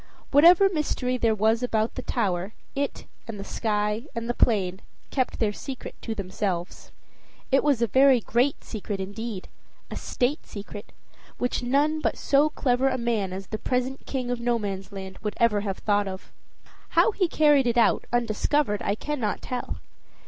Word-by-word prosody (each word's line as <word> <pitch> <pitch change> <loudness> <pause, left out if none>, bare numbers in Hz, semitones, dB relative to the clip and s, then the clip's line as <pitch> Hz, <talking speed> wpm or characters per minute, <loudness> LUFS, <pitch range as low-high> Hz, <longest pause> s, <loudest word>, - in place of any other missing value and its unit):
Whatever 340 +7 +7
mystery 295 -7 -1
there 230 -3 +2
was 220 +3 +2
about 225 -2 0
the 255 - -5
tower, 190 -3 -1 0.2
it 280 0 -3 0.2
and 220 -3 -6
the - - -5
sky 210 +3 -1
and 230 0 -3
the 240 - 0
plain 195 -6 +1 0.3
kept 260 -2 0
their 215 -3 +1
secret 265 +4 -7
to 225 - -4
themselves. 190 -2 -4 0.6
It 270 - +4
was 280 -5 +2
a - - +5
very 265 +3 +5
great 245 +5 0
secret 205 -2 -5
indeed, 200 +1 -5 0.4
a - - -4
state 260 +4 -1
secret, 205 0 -9 0.5
which 245 +1 -1
none 285 +5 +2
but - - 0
so 285 +2 +3
clever 265 -2 +1
a 260 - -1
man 230 -6 -1
as 190 +1 -5
the 215 +3 -5
present 255 +1 -2
King 255 -2 -2
of 245 - -2
Nomansland 195 -5 -3
would 210 -1 -3
ever 220 -3 +3
have 195 -2 -3
thought 205 -1 +1
of. 190 0 -7 0.7
How - - +6
he 390 -3 +1
carried 295 -5 +4
it 240 0 +1
out, 230 - +3
undiscovered, 235 0 +1
I 200 - 0
cannot 250 -4 -3
tell. 250 -1 -4
235 Hz, 165 wpm, -26 LUFS, 205-265 Hz, 0.7 s, Whatever